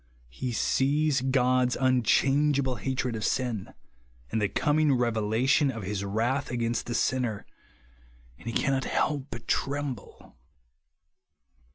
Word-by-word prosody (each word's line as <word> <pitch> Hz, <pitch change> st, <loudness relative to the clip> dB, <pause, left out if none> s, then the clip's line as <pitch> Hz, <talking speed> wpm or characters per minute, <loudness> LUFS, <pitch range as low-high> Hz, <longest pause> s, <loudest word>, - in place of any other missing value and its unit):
He 125 Hz, -, -4 dB
sees 140 Hz, +4 st, +1 dB
God's 130 Hz, -1 st, +2 dB
unchangeable 135 Hz, +2 st, +2 dB
hatred 130 Hz, -3 st, -2 dB
of 110 Hz, -, -4 dB
sin, 120 Hz, -4 st, -1 dB, 0.6 s
and 110 Hz, -, 0 dB
the 105 Hz, -, +1 dB
coming 150 Hz, +6 st, +2 dB
revelation 120 Hz, +4 st, +2 dB
of 115 Hz, -5 st, -5 dB
his 100 Hz, +1 st, -3 dB
WTath 115 Hz, +7 st, -1 dB
against 120 Hz, -1 st, -2 dB
the 120 Hz, -, -2 dB
sinner; 120 Hz, -6 st, -1 dB, 0.9 s
and -, -, -12 dB
he -, -, -1 dB
cannot 135 Hz, +2 st, 0 dB, 0.4 s
but 115 Hz, -1 st, -8 dB
tremble. 140 Hz, -, -3 dB
125 Hz, 110 wpm, -27 LUFS, 115-135 Hz, 0.9 s, God's